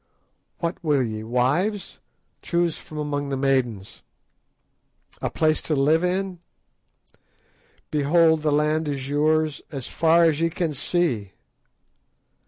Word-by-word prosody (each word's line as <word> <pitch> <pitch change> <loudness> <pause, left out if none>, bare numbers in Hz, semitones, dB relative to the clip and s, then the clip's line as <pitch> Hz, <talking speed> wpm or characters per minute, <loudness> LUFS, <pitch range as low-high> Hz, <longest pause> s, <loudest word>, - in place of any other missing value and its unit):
What 170 +1 -4
will 145 -4 +2
ye—wives? 125 - -1 0.4
Choose 170 -2 0
from 155 - -11
among 145 -1 -2
the 135 - -2
maidens! 130 -7 -1 1.2
A - - -1
place 155 -1 +1
to 155 - -1
live 155 +5 +3
in? 185 0 -1 1.5
Behold, 160 +2 +3
the 150 -1 +1
land 150 +2 +1
is 135 -2 -3
yours 155 +1 +1
as 135 -5 -5
far 165 +1 +3
as 160 -2 +2
ye 165 - +2
can 165 -1 -2
see. 140 - -1
150 Hz, 115 wpm, -24 LUFS, 135-165 Hz, 1.5 s, live